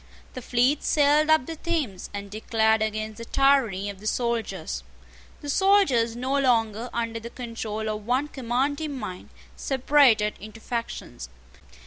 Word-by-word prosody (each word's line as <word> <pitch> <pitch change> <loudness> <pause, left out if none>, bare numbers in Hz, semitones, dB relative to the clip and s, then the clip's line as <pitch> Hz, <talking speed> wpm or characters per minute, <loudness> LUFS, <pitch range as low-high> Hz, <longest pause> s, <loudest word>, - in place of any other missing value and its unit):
The 255 - -6
fleet 250 +5 +2
sailed 300 +1 +3
up 315 -4 +4
the 325 - -6
Thames, 300 - -3
and 200 -1 -7
declared 220 0 +1
against 215 0 -3
the - - -6
tyranny 235 -8 +2
of 200 -2 -6
the 215 - -7
soldiers. 235 -1 -2 0.6
The 290 - -8
soldiers, 285 - +3
no 260 +3 0
longer 230 -3 +1
under 230 -1 -2
the 230 +1 -8
control 230 -3 -5
of 215 0 -4
one 260 +4 +1
commanding 275 +3 -2
mind, 200 -6 -7 0.3
separated 260 -6 +3
into 215 +2 -10
factions. 230 - -5
235 Hz, 140 wpm, -25 LUFS, 220-275 Hz, 0.6 s, up